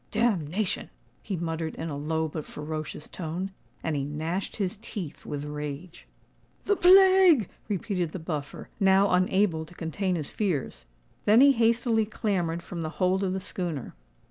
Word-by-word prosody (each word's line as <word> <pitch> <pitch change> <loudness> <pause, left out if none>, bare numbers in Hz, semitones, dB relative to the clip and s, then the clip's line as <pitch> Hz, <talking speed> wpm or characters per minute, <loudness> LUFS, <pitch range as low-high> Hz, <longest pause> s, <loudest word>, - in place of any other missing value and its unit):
"Damnation!" 205 -4 0 0.3
he 195 - -3
muttered 165 -1 -3
in 160 0 -4
a - - -3
low 160 +2 -1
but 155 0 -5
ferocious 155 0 -6
tone; 180 +3 -4 0.3
and 160 -2 -1
he 140 - -1
gnashed 160 +6 -3
his 200 0 -2
teeth 195 -9 -7
with 145 0 -4
rage. 150 +3 -6 0.6
"The 410 - +3
plague!" 370 - +7 0.2
repeated 185 -3 -1
the 175 - -6
Buffer, 155 -4 -5
now 195 0 +4
unable 180 -2 +2
to 175 +3 -14
contain 180 +3 -2
his 155 -4 -4
fears. 175 - -2 0.4
Then 215 +3 +6
he 280 +1 +8
hastily 230 -2 +2
clambered 175 -6 -1
from 175 -2 -6
the 160 - -2
hold 190 +1 +2
of 185 -1 0
the 190 - -1
schooner. 175 -7 -4
180 Hz, 155 wpm, -27 LUFS, 160-205 Hz, 0.6 s, he